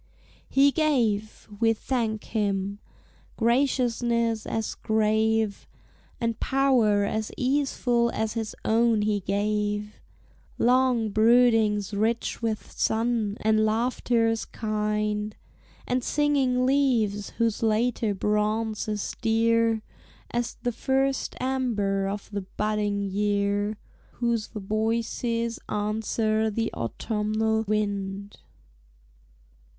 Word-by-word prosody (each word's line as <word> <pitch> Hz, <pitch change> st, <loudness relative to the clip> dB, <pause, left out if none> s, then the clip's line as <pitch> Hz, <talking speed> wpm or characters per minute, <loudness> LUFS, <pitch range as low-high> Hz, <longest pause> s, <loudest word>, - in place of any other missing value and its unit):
He 280 Hz, +1 st, +5 dB
gave; 235 Hz, -9 st, 0 dB
we 225 Hz, -1 st, +4 dB
thank 225 Hz, -2 st, -2 dB
him! 200 Hz, -2 st, -2 dB, 0.6 s
Graciousness 235 Hz, -2 st, +1 dB
as 225 Hz, -1 st, -2 dB
grave, 220 Hz, -1 st, +1 dB, 0.5 s
And 230 Hz, -1 st, -1 dB
power 250 Hz, -7 st, +3 dB
as 215 Hz, +2 st, -2 dB
easeful 255 Hz, -3 st, +1 dB
as 220 Hz, -1 st, -2 dB
his 225 Hz, -2 st, -4 dB
own 225 Hz, -1 st, +3 dB
he 210 Hz, -1 st, +1 dB
gave; 210 Hz, +2 st, -2 dB, 0.6 s
Long 250 Hz, -2 st, +3 dB
broodings 220 Hz, -2 st, +3 dB
rich 225 Hz, +4 st, -1 dB
with 225 Hz, -2 st, -3 dB
sun, 225 Hz, -2 st, 0 dB
and 215 Hz, 0 st, +3 dB
laughters 225 Hz, 0 st, +1 dB
kind; 210 Hz, -1 st, -2 dB, 0.5 s
And 250 Hz, 0 st, -1 dB
singing 270 Hz, -4 st, +2 dB
leaves, 240 Hz, -7 st, +1 dB
whose 230 Hz, -2 st, 0 dB
later 225 Hz, -1 st, +1 dB
bronze 210 Hz, +2 st, 0 dB
is 210 Hz, -1 st, -3 dB
dear 225 Hz, -1 st, +2 dB, 0.5 s
As 240 Hz, -1 st, -2 dB
the 245 Hz, -, +1 dB
first 270 Hz, +3 st, 0 dB
amber 220 Hz, -7 st, 0 dB
of 200 Hz, +1 st, -4 dB
the 205 Hz, -1 st, -3 dB
budding 205 Hz, +1 st, -1 dB
year, 205 Hz, +1 st, 0 dB, 0.4 s
Whose 235 Hz, -3 st, -1 dB
voices 230 Hz, +2 st, -2 dB
answer 215 Hz, +1 st, 0 dB
the 225 Hz, +1 st, -2 dB
autumnnal 220 Hz, -, -1 dB
wind. 200 Hz, -1 st, -2 dB
220 Hz, 95 wpm, -26 LUFS, 210-235 Hz, 0.6 s, He